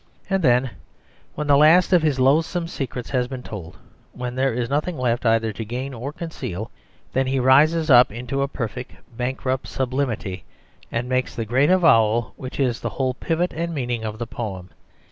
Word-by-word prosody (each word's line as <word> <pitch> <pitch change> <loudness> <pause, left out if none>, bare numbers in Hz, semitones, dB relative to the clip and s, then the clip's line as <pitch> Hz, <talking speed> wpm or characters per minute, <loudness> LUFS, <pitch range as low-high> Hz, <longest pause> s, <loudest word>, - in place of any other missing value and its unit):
And 195 0 +2
then, 125 -1 +3 0.6
when 150 - -3
the 145 -1 +5
last 165 +5 +5
of 175 - +6
his 150 -4 +1
loathsome 160 +6 +2
secrets 130 -6 -5
has 125 -2 +1
been 130 -1 -7
told, 85 -6 -8 0.4
when 125 0 -5
he 130 - -1
has 125 -3 0
nothing 150 +5 -1
left 120 -1 0
either 115 -1 +2
to 115 - -5
gain 125 +5 -5
or 125 +4 -5
to - - -26
conceal, 125 - -5 0.4
then 130 0 +1
he 135 0 0
rises 155 +5 +4
up 125 0 +8
into 125 +5 -3
a 140 - +1
perfect 125 -2 -5 0.2
bankrupt 130 +1 -2
sublimity 125 -7 -2 0.5
and 115 +1 -2
makes 130 0 -1
the 115 - -3
great 130 +7 +2
avowal 115 -11 +4
which 130 +1 -8
is 125 -4 +1
the - - -3
whole 130 -1 -1
pivot 165 +6 -1
and 170 +1 -3
meaning 120 -4 -2
of 110 -1 -4
the 120 - -4
poem. 95 -6 -6
130 Hz, 185 wpm, -22 LUFS, 120-145 Hz, 0.6 s, up